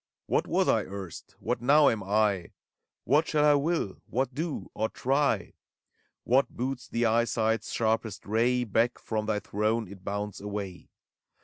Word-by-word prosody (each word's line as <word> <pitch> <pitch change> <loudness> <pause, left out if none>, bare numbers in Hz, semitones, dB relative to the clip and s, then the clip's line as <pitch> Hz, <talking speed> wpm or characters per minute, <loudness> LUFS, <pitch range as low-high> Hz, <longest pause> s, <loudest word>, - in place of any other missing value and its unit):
What - - 0
was - - +2
I - - +4
erst? 95 -3 -8
What - - -2
now 145 +4 +6
am 110 - +2
I? 100 -2 +1 0.5
What 150 +6 +3
shall 150 -1 +2
I 150 - +6
will? 145 - 0
— - - -46
what 130 0 +1
do, 155 +2 -4
or 110 +1 -1
try? 140 +3 0 0.7
What 130 +3 +3
boots 125 +1 -4
the 120 0 0
eyesight's 115 0 +1
sharpest 110 -2 -1
ray? 120 +4 +2
Back 115 +2 +1
from 110 -1 -3
thy 110 -1 +1
throne 105 +2 -1
it 95 0 -12
bounds 100 0 -4
away. 100 -3 -6
115 Hz, 155 wpm, -28 LUFS, 105-130 Hz, 0.7 s, now